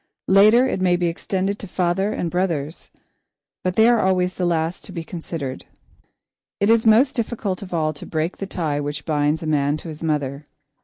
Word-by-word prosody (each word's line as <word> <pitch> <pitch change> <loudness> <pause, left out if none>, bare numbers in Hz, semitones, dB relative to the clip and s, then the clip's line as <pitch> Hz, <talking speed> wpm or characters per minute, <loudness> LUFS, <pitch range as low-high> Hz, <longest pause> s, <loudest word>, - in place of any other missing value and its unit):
Later, 215 +6 +6
it 190 - -2
may 180 -1 +3
be 175 0 0
extended 190 +4 -2
to 200 - -7
father 185 +3 0
and 170 -5 -3
brothers, 170 -4 -2 0.7
but 185 0 -1
they 220 +1 +5
are 240 -1 +4
always 185 -2 +1
the 180 -1 -1
last 165 0 -1
to - - -10
be 170 -3 -5
considered. 160 -5 -6 0.9
It 200 +2 +3
is 230 0 +3
most 245 +6 +5
difficult 220 -5 -2
of 195 - -9
all 155 -2 0
to 145 - -10
break 160 +2 -2
the 195 - -5
tie 155 -6 -2
which 145 0 -4
binds 150 0 0
a - - -4
man 145 -1 +1
to 165 - -8
his 155 -1 -9
mother. 145 -3 -2
175 Hz, 195 wpm, -22 LUFS, 155-195 Hz, 0.9 s, Later